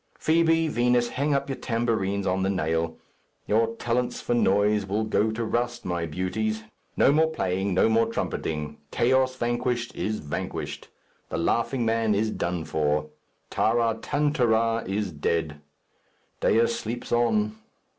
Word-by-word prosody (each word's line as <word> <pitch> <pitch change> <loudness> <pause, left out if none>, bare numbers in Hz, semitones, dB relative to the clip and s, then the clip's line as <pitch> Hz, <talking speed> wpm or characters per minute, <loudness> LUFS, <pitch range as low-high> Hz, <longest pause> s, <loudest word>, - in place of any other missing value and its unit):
Fibi, 165 0 +3
Vinos, 120 -3 +2
hang 140 +2 0
up 140 - -1
your 135 - -4
tambourines 110 -5 -1
on 95 0 +1
the 95 - +1
nail. 80 -3 -1 0.5
Your 115 +2 +1
talents 120 +1 -1
for - - -1
noise 105 -2 +3
will 100 +3 -1
go 110 0 +1
to 110 +1 -2
rust, 120 +1 -2
my 85 -2 -2
beauties; 100 +7 -2 0.3
no - - +5
more 160 +2 +4
playing, 95 - -1
no 95 - +4
more 115 0 +3
trumpeting 75 -9 -3
'Chaos 130 +1 +2
Vanquished' 120 0 -1
is 110 0 -2
vanquished. 75 -5 -5 0.4
'The - - -3
Laughing 115 +8 0
Man' 115 -1 +2
is 110 +2 +1
done 85 -4 -2
for. 75 -1 0 0.4
'Taratantara' 115 - +1
is 100 0 -1
dead. 75 0 -2 0.8
Dea 115 +1 +4
sleeps 115 +1 -4
on. 110 -3 +2
110 Hz, 135 wpm, -26 LUFS, 95-120 Hz, 0.8 s, no